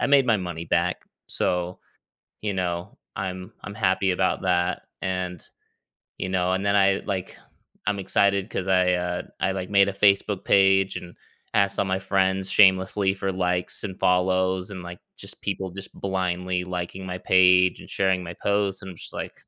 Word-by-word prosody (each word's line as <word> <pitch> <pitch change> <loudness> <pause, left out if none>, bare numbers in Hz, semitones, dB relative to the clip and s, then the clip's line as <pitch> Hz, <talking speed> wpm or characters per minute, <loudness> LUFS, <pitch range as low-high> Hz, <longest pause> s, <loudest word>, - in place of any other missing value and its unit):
"I - - +2
made 140 -2 +5
my 115 -3 +4
money 90 -3 -5
back." 85 +2 0 0.3
So, 90 0 -1 0.6
you 105 -2 -2
know, 90 0 -3 0.2
I'm 95 -1 -5
I'm 100 - -7
happy 95 -2 +1
about 95 +1 0
that, 90 -1 +1 0.2
and 90 -2 -3 0.8
you 95 - -3
know, 90 -1 +1
and 95 +1 -1
then 100 0 +2
I, 95 -1 +3
like 95 -3 -4 0.5
I'm 105 0 0
excited 100 +1 +1
'cause 95 - -3
I, 90 -1 +3
uh, 90 0 -2 0.2
I, 95 - +1
like, 95 -1 -4
made 100 -1 +5
a 100 - -1
Facebook 100 0 +2
page, 95 0 +4
and 85 0 -8 0.4
asked 100 -1 +2
all - - +2
my 95 -1 0
friends 95 0 0
shamelessly 95 0 +4
for 95 0 -2
likes 90 -1 -1
and 95 -3 -5
follows, 95 +1 +1
and, 95 -2 -7
like, 90 0 -8 0.2
just - - -10
people 95 -1 -3
just 95 +2 -9
blindly 90 -1 -2
liking 90 +1 -5
my 90 0 -4
page 90 0 +4
and - - -13
sharing 95 -1 +1
my 85 0 -7
post, 100 -1 +1
and 95 - -7
I'm 90 - -11
just - - -7
like - - -6
95 Hz, 180 wpm, -25 LUFS, 90-95 Hz, 0.8 s, made